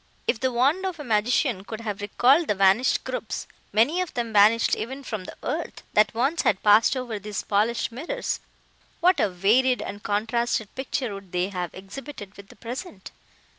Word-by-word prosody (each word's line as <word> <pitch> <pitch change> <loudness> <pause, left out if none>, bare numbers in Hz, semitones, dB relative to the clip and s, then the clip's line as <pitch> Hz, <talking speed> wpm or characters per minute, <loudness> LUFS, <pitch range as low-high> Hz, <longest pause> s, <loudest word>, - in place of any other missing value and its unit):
If - - 0
the 260 +1 0
wand 275 +10 +2
of 355 -4 -5
a - - -5
magician 225 -1 +1
could 220 +2 -7
have 210 -2 -4
recalled 265 - +3
the 210 - +1
vanished 195 +6 +3
groups, - - -4 0.3
many 255 - +3
of 365 - -5
them 235 -2 -2
vanished 215 +3 +5
even 265 +4 -6
from 215 -7 -5
the - - -10
earth, 315 +5 -4
that 210 +1 +3
once 275 +8 +1
had 195 - +1
passed 215 +5 +5
over 240 -4 -4
these 205 0 -5
polished 220 +4 0
mirrors, 345 - -3 0.6
what 360 +1 +4
a 210 - +3
varied 225 +8 +3
and 205 - -6
contrasted 225 +1 -1
picture 260 -3 -3
would 195 -2 -10
they 180 +1 0
have 180 -3 -3
exhibited 200 +1 -9
with 200 -1 -13
the - - -16
present! 235 - -8
230 Hz, 180 wpm, -25 LUFS, 205-260 Hz, 0.6 s, vanished